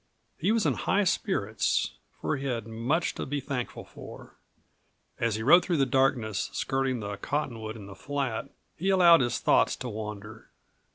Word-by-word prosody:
He 190 Hz, +6 st, +2 dB
was 225 Hz, -4 st, +2 dB
in 145 Hz, -, +3 dB
high 200 Hz, +10 st, +1 dB
spirits, 140 Hz, -, 0 dB, 0.3 s
for -, -, -1 dB
he 135 Hz, +1 st, -4 dB
had 115 Hz, -4 st, -2 dB
much 115 Hz, +9 st, -1 dB
to -, -, -5 dB
be 145 Hz, +1 st, -2 dB
thankful 130 Hz, -4 st, -5 dB
for. -, -, -12 dB, 0.9 s
As 115 Hz, -2 st, +1 dB
he 110 Hz, -, -3 dB
rode 175 Hz, +8 st, +7 dB
through 175 Hz, -3 st, 0 dB
the 135 Hz, -, +3 dB
darkness, 125 Hz, -6 st, +1 dB
skirting 135 Hz, -2 st, -1 dB
the 100 Hz, -1 st, -5 dB
cottonwood 115 Hz, -3 st, -3 dB
in 105 Hz, -3 st, -9 dB
the 100 Hz, -, -10 dB
flat, 135 Hz, +3 st, -3 dB, 0.3 s
he 190 Hz, +4 st, -1 dB
allowed 175 Hz, -5 st, +7 dB
his 120 Hz, -2 st, 0 dB
thoughts -, -, +3 dB
to 125 Hz, -, -6 dB
wander. 105 Hz, 0 st, -7 dB
130 Hz, 170 wpm, -28 LUFS, 110-150 Hz, 0.9 s, rode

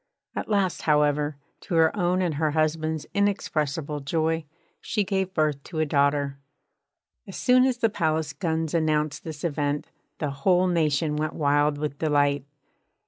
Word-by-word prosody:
At -, -, -4 dB
last, 200 Hz, -4 st, +1 dB
however, 150 Hz, -1 st, +2 dB, 0.2 s
to 175 Hz, -, -4 dB
her 160 Hz, -1 st, +4 dB
own 180 Hz, -1 st, +1 dB
and 170 Hz, -3 st, 0 dB
her 155 Hz, +1 st, 0 dB
husband's 155 Hz, 0 st, 0 dB
inexpressible 155 Hz, -7 st, -1 dB
joy, 160 Hz, +2 st, -1 dB, 0.3 s
she 210 Hz, -3 st, -1 dB
gave 190 Hz, -1 st, -2 dB
birth 150 Hz, -3 st, +1 dB
to 165 Hz, -, -7 dB
a 155 Hz, -, +2 dB
daughter. 140 Hz, -1 st, +1 dB, 0.9 s
As -, -, -7 dB
soon 255 Hz, 0 st, +4 dB
as 260 Hz, -2 st, +1 dB
the 225 Hz, -2 st, +2 dB
palace 160 Hz, -5 st, 0 dB
guns 160 Hz, 0 st, -2 dB
announced 155 Hz, -2 st, 0 dB
this 155 Hz, -2 st, -7 dB
event, 145 Hz, -3 st, -1 dB, 0.3 s
the 150 Hz, -2 st, -2 dB
whole 180 Hz, +7 st, +2 dB
nation 155 Hz, -3 st, +1 dB
went 155 Hz, +1 st, -1 dB
wild 145 Hz, 0 st, +2 dB
with 145 Hz, -1 st, -4 dB
delight. 145 Hz, -3 st, +2 dB
155 Hz, 150 wpm, -25 LUFS, 145-170 Hz, 0.9 s, her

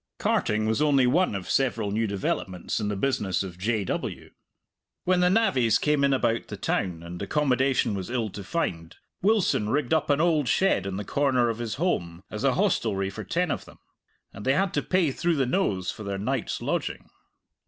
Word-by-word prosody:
Carting 110 Hz, 0 st, +1 dB
was 110 Hz, +5 st, +1 dB
only 140 Hz, -4 st, +4 dB
one 155 Hz, -, +2 dB
of 95 Hz, -2 st, -5 dB
several 115 Hz, -6 st, 0 dB
new 110 Hz, +2 st, 0 dB
developments 95 Hz, -2 st, -2 dB
in 105 Hz, -, -2 dB
the 105 Hz, -, -1 dB
business 100 Hz, -5 st, 0 dB
of 90 Hz, -2 st, -8 dB
J. 110 Hz, +1 st, 0 dB
W. -, -, -4 dB, 0.7 s
When 185 Hz, 0 st, +2 dB
the 180 Hz, 0 st, +4 dB
navvies 135 Hz, -, +3 dB
came 150 Hz, -1 st, +1 dB
in 140 Hz, -, +4 dB
about 120 Hz, -3 st, +1 dB
the -, -, -7 dB
town 85 Hz, -3 st, -2 dB
and 85 Hz, +1 st, -8 dB
accommodation 135 Hz, -5 st, +1 dB
was 95 Hz, 0 st, -4 dB
ill 120 Hz, -4 st, -1 dB
to 100 Hz, -, -7 dB
find, 90 Hz, -, -3 dB, 0.3 s
Wilson 195 Hz, -, +2 dB
rigged 140 Hz, +1 st, 0 dB
up 160 Hz, -, +1 dB
an 145 Hz, 0 st, +3 dB
old 155 Hz, -5 st, +2 dB
shed 115 Hz, -, +2 dB
in 95 Hz, -1 st, -3 dB
the 105 Hz, -, -4 dB
corner 130 Hz, -3 st, +2 dB
of 115 Hz, 0 st, -3 dB
his 115 Hz, -3 st, -3 dB
holm 90 Hz, -, -2 dB
as 105 Hz, +3 st, -5 dB
a 135 Hz, -2 st, +3 dB
hostelry 110 Hz, -, 0 dB
for -, -, -7 dB
ten 180 Hz, +1 st, 0 dB
of -, -, -3 dB
them -, -, -15 dB, 0.6 s
and 100 Hz, -, -9 dB
they 135 Hz, -, +3 dB
had 190 Hz, +5 st, +1 dB
to 145 Hz, -, +1 dB
pay 180 Hz, -4 st, +1 dB
through 170 Hz, +5 st, 0 dB
the 135 Hz, -3 st, +1 dB
nose 100 Hz, -, 0 dB
for -, -, -11 dB
their 100 Hz, -1 st, -3 dB
night's 125 Hz, +5 st, -2 dB
lodging. -, -, -3 dB
120 Hz, 200 wpm, -26 LUFS, 100-150 Hz, 0.7 s, only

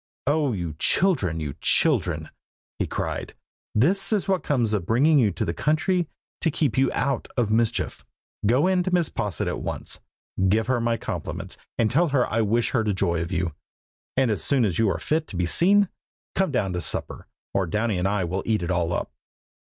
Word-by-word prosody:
"Oh! 145 Hz, 0 st, +2 dB
you 85 Hz, -7 st, -3 dB
children, 100 Hz, -, +2 dB
you 75 Hz, -3 st, -4 dB
children!" -, -, +2 dB, 0.5 s
he -, -, 0 dB
cried. -, -, -4 dB, 0.4 s
"This 175 Hz, -, +2 dB
is 210 Hz, -3 st, +1 dB
what 190 Hz, -2 st, +1 dB
comes 120 Hz, -7 st, +1 dB
of 95 Hz, -5 st, -1 dB
bringing 145 Hz, +7 st, +4 dB
you 115 Hz, -5 st, +4 dB
to -, -, -2 dB
the 85 Hz, -, -1 dB
country 160 Hz, -, +1 dB, 0.3 s
to 165 Hz, -, +1 dB
keep 145 Hz, -5 st, 0 dB
you 130 Hz, -1 st, +3 dB
out 135 Hz, -3 st, -1 dB
of 115 Hz, -4 st, +1 dB
mischief. 115 Hz, +1 st, 0 dB, 0.4 s
Go 125 Hz, -, +3 dB
in 185 Hz, -1 st, +3 dB
to 180 Hz, -, -1 dB
Mrs. 175 Hz, -3 st, +1 dB
Posset 100 Hz, -7 st, -2 dB
at -, -, -2 dB
once, -, -, -5 dB, 0.5 s
give 110 Hz, +3 st, +2 dB
her 125 Hz, 0 st, +1 dB
my 115 Hz, 0 st, +1 dB
compliments, -, -, -5 dB, 0.2 s
and 110 Hz, -2 st, +2 dB
tell 170 Hz, +7 st, +3 dB
her 135 Hz, -4 st, +2 dB
I 115 Hz, +1 st, 0 dB
wish 115 Hz, +2 st, +1 dB
her 120 Hz, -5 st, +1 dB
joy 95 Hz, -5 st, 0 dB
of 85 Hz, +3 st, -4 dB
you. 90 Hz, -3 st, -1 dB, 0.6 s
And 130 Hz, -3 st, +3 dB
as 105 Hz, -, -1 dB
soon 135 Hz, -5 st, +2 dB
as 90 Hz, -6 st, -1 dB
you 110 Hz, -2 st, +3 dB
are 95 Hz, -, 0 dB
fit 155 Hz, +1 st, -1 dB
to -, -, -7 dB
be 90 Hz, 0 st, +1 dB
seen, 195 Hz, -, +4 dB, 0.5 s
come 190 Hz, -1 st, +1 dB
down 105 Hz, -9 st, 0 dB
to 90 Hz, -, -2 dB
supper, 75 Hz, -, -3 dB, 0.3 s
or 95 Hz, -2 st, +1 dB
Downy 105 Hz, +2 st, 0 dB
and 90 Hz, -, +1 dB
I 100 Hz, -1 st, 0 dB
will 90 Hz, +3 st, -2 dB
eat 110 Hz, -5 st, +1 dB
it 85 Hz, -, -2 dB
all 85 Hz, -1 st, 0 dB
up." -, -, -3 dB
115 Hz, 200 wpm, -25 LUFS, 95-150 Hz, 0.6 s, bringing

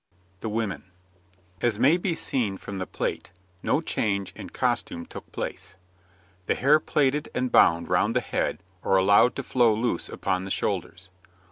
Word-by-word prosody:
THE 110 Hz, -, -4 dB
WOMEN 105 Hz, -4 st, -3 dB, 0.8 s
As 120 Hz, -3 st, +1 dB
may 135 Hz, +8 st, +5 dB
be 180 Hz, -1 st, -1 dB
seen 110 Hz, -11 st, 0 dB
from 100 Hz, 0 st, -7 dB
the 95 Hz, -, -4 dB
plate, -, -, -3 dB, 0.3 s
no -, -, +1 dB
change 100 Hz, -2 st, -1 dB
in -, -, -8 dB
costume 85 Hz, 0 st, -1 dB
took -, -, -11 dB
place. 100 Hz, -, -5 dB, 0.7 s
The -, -, +2 dB
hair 145 Hz, +4 st, +4 dB
plaited 145 Hz, -1 st, 0 dB
and 125 Hz, -1 st, -1 dB
bound 85 Hz, 0 st, +5 dB
round 100 Hz, +6 st, +1 dB
the -, -, +4 dB
head 100 Hz, -3 st, -2 dB, 0.2 s
or 95 Hz, -, +2 dB
allowed 100 Hz, +6 st, +5 dB
to 140 Hz, -, -4 dB
flow 120 Hz, -4 st, +3 dB
loose 115 Hz, +2 st, -1 dB
upon 90 Hz, 0 st, -2 dB
the 95 Hz, -, -6 dB
shoulders. 95 Hz, 0 st, -3 dB
105 Hz, 160 wpm, -26 LUFS, 95-125 Hz, 0.8 s, may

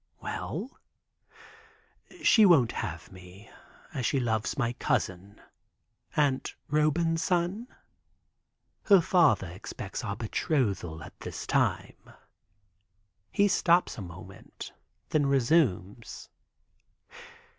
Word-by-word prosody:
"Well?" 205 Hz, -, -6 dB, 1.4 s
"She 220 Hz, -, +6 dB
won't 160 Hz, -, +5 dB
have 85 Hz, -6 st, -6 dB
me, 95 Hz, +3 st, -14 dB, 0.4 s
as 130 Hz, -, -3 dB
she 135 Hz, -, +1 dB
loves 110 Hz, -2 st, -1 dB
my 120 Hz, -3 st, 0 dB
cousin, 95 Hz, -3 st, -2 dB, 0.8 s
Aunt 140 Hz, -3 st, +1 dB, 0.2 s
Roban's 165 Hz, +2 st, +1 dB
son. 180 Hz, +7 st, -1 dB, 1.2 s
Her 200 Hz, -2 st, +7 dB
father 170 Hz, -, +3 dB
expects 95 Hz, +4 st, -7 dB
our 100 Hz, -3 st, -3 dB
betrothal 100 Hz, -, -2 dB
at -, -, -13 dB
this -, -, -7 dB
time." -, -, -1 dB, 1.2 s
He 205 Hz, -, +3 dB
stops 180 Hz, -2 st, +2 dB
a -, -, -7 dB
moment, 85 Hz, -2 st, -11 dB, 0.4 s
then 145 Hz, -2 st, +2 dB
resumes. 120 Hz, -, 0 dB
130 Hz, 90 wpm, -28 LUFS, 100-165 Hz, 1.4 s, Her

